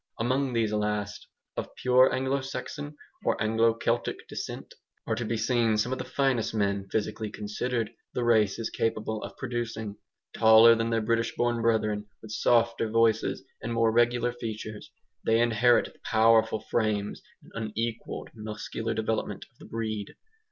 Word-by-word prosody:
Among 130 Hz, +3 st, 0 dB
these 110 Hz, -2 st, +1 dB
last 105 Hz, -1 st, -2 dB, 0.3 s
of -, -, -5 dB
pure 130 Hz, +1 st, +5 dB
Anglo 135 Hz, +1 st, 0 dB
Saxon 145 Hz, +3 st, -6 dB, 0.3 s
or -, -, +1 dB
Anglo 115 Hz, +1 st, +3 dB
Celtic 115 Hz, +1 st, -2 dB
descent -, -, -6 dB, 0.3 s
are 115 Hz, -, -1 dB
to 115 Hz, +2 st, -2 dB
be 115 Hz, 0 st, -1 dB
seen 115 Hz, -1 st, +2 dB
some 115 Hz, +4 st, 0 dB
of 130 Hz, -, -2 dB
the -, -, -2 dB
finest 130 Hz, -5 st, 0 dB
men, 100 Hz, -2 st, 0 dB
physically 110 Hz, 0 st, -2 dB
considered, 110 Hz, +3 st, -3 dB, 0.2 s
the 125 Hz, -, 0 dB
race 110 Hz, -4 st, +3 dB
is 115 Hz, -, -3 dB
capable 110 Hz, -1 st, -1 dB
of -, -, -8 dB
producing. 115 Hz, -4 st, -4 dB, 0.4 s
Taller 110 Hz, +1 st, +8 dB
than 115 Hz, 0 st, 0 dB
their 115 Hz, -1 st, +1 dB
British 115 Hz, +1 st, 0 dB
born 120 Hz, -1 st, +1 dB
brethren, 110 Hz, -2 st, +1 dB
with 110 Hz, -, -11 dB
softer 115 Hz, 0 st, +2 dB
voices 115 Hz, 0 st, +2 dB, 0.2 s
and 115 Hz, -, -3 dB
more 115 Hz, -1 st, +3 dB
regular 120 Hz, +1 st, +2 dB
features, 110 Hz, -3 st, -6 dB, 0.3 s
they 110 Hz, 0 st, +3 dB
inherit 120 Hz, +1 st, +3 dB
the -, -, -26 dB
powerful 110 Hz, -1 st, +3 dB
frames 110 Hz, -3 st, -1 dB, 0.3 s
and 110 Hz, -1 st, -4 dB
unequalled 115 Hz, 0 st, -3 dB
muscular 110 Hz, +1 st, -4 dB
development 110 Hz, 0 st, -2 dB
of -, -, -37 dB
the -, -, -12 dB
breed. 110 Hz, -3 st, -4 dB
115 Hz, 155 wpm, -28 LUFS, 110-120 Hz, 0.4 s, Taller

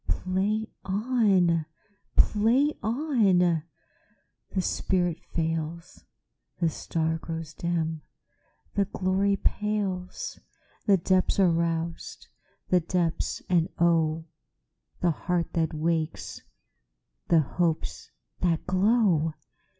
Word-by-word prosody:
Play 200 Hz, +4 st, 0 dB, 0.2 s
on! 195 Hz, -6 st, +2 dB, 0.5 s
Play 240 Hz, +8 st, +4 dB
on! 210 Hz, -, +2 dB, 0.9 s
The 190 Hz, -, -1 dB
spirit 175 Hz, -2 st, 0 dB
fails, 165 Hz, +1 st, -3 dB, 0.5 s
The 170 Hz, -2 st, +2 dB
star 160 Hz, 0 st, -2 dB
grows 165 Hz, -1 st, -6 dB
dim, 165 Hz, -2 st, -2 dB, 0.7 s
the 200 Hz, -1 st, +2 dB
glory 195 Hz, +1 st, +1 dB
pales, 205 Hz, -, -2 dB, 0.5 s
The 200 Hz, -2 st, +6 dB
depths 185 Hz, +2 st, +1 dB
are 185 Hz, -3 st, +5 dB
roused—the 165 Hz, +2 st, -2 dB
depths, 170 Hz, 0 st, -1 dB
and 175 Hz, -2 st, +2 dB
oh! 165 Hz, -2 st, +2 dB, 0.8 s
The 175 Hz, -, +3 dB
heart 175 Hz, +2 st, -2 dB
that 160 Hz, -1 st, +1 dB
wakes, 160 Hz, 0 st, -2 dB, 0.9 s
the 165 Hz, -2 st, +5 dB
hopes 165 Hz, +2 st, -2 dB, 0.3 s
that 170 Hz, -3 st, 0 dB
glow! 185 Hz, -5 st, +2 dB
175 Hz, 90 wpm, -27 LUFS, 165-195 Hz, 0.9 s, The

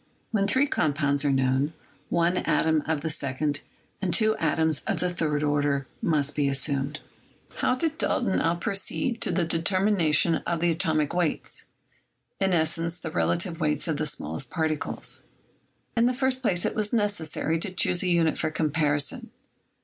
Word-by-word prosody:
When 200 Hz, -3 st, +1 dB
three 260 Hz, +7 st, +3 dB
compounds 145 Hz, -, +1 dB
are 145 Hz, -, +2 dB
known, 135 Hz, +3 st, +1 dB, 0.4 s
one 170 Hz, +1 st, +2 dB
atom 160 Hz, -1 st, +2 dB
of 160 Hz, -2 st, 0 dB
the 160 Hz, +1 st, -1 dB
second 145 Hz, +1 st, -1 dB, 0.4 s
and 190 Hz, -3 st, 0 dB
two 220 Hz, +1 st, +3 dB
atoms 160 Hz, -2 st, +1 dB
of -, -, 0 dB
the 180 Hz, -, 0 dB
third 150 Hz, -4 st, -1 dB
order 145 Hz, -2 st, +1 dB, 0.2 s
must 150 Hz, -3 st, 0 dB
be 145 Hz, -2 st, +1 dB
assumed. 140 Hz, +1 st, +1 dB, 0.6 s
How 255 Hz, -, +1 dB
did 315 Hz, +4 st, -2 dB
Dalton 205 Hz, -6 st, +1 dB
now 165 Hz, +1 st, +1 dB
proceed 225 Hz, +5 st, -1 dB
to -, -, +1 dB
the 175 Hz, 0 st, +1 dB
determination 165 Hz, -1 st, +2 dB
of 170 Hz, -1 st, -3 dB
the 170 Hz, +1 st, +2 dB
atomic 155 Hz, -2 st, +1 dB
weights 175 Hz, -3 st, -2 dB, 0.4 s
— -, -, -40 dB
i.e., 195 Hz, -, +3 dB
the 165 Hz, -1 st, 0 dB
relative 170 Hz, -1 st, 0 dB
weights 150 Hz, -1 st, 0 dB
of 160 Hz, -3 st, -1 dB
the 155 Hz, -, 0 dB
small 80 Hz, -, -3 dB
est -, -, -2 dB
particles? 160 Hz, -3 st, -2 dB, 0.7 s
In 235 Hz, 0 st, +4 dB
the 250 Hz, -, 0 dB
first 260 Hz, 0 st, +1 dB
place 180 Hz, -8 st, +1 dB
it -, -, 0 dB
was 210 Hz, -1 st, -2 dB
necessary 185 Hz, -7 st, 0 dB
to 190 Hz, +3 st, -2 dB
choose 180 Hz, -1 st, +2 dB
a 185 Hz, -, -1 dB
unit 170 Hz, -2 st, +2 dB
for 155 Hz, -, 0 dB
comparison. 150 Hz, -2 st, 0 dB
160 Hz, 165 wpm, -26 LUFS, 150-185 Hz, 0.7 s, In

